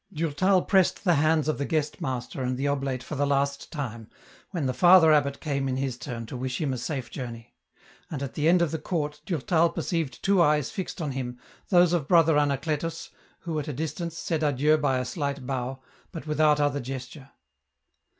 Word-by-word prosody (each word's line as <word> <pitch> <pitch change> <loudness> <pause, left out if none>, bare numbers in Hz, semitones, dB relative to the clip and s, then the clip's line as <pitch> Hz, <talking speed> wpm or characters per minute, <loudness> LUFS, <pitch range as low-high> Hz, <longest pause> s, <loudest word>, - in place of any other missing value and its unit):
Durtal 170 +3 +1
pressed 190 -3 +2
the 180 -4 +4
hands 155 0 +2
of 155 - 0
the 140 - -1
guest 155 +2 -1
master 130 -3 -4
and 125 0 -1
the 140 +2 -1
oblate 135 -3 -1
for 140 - -7
the 145 0 0
last 140 0 -1
time, 115 -8 -5 0.4
when 170 -7 -3
the 130 - 0
Father 175 0 +7
abbot 140 -2 +2
came 140 -3 -2
in 130 - -1
his 135 -2 -2
turn 120 -2 -6
to 115 - -8
wish 130 0 -3
him 145 -4 -1
a - - -3
safe 125 -2 -4
journey; 120 -3 -7 0.6
and 140 -3 -4
at 135 - -5
the 150 +1 0
end 175 0 +5
of 160 - -1
the 160 - -2
court 150 -2 -3
Durtal 165 +1 +2
perceived 160 -10 -3
two 195 -2 +4
eyes 150 -3 +2
fixed 185 -2 -5
on 145 - -2
him, 125 -2 -4 0.3
those 175 -2 +5
of 160 -5 0
Brother 165 -2 +5
Anacletus, 150 +3 -2 0.3
who, 165 -3 -3
at 150 - -5
a 150 - -3
distance, 160 +4 -4
said 160 -3 -2
adieu 150 +1 +3
by 145 -4 +1
a 125 - -1
slight 140 -1 -3
bow, 130 0 -4 0.3
but 165 -4 -7
without 150 -1 +3
other 145 -1 +1
gesture. 130 +2 -7
145 Hz, 200 wpm, -26 LUFS, 130-160 Hz, 0.6 s, Father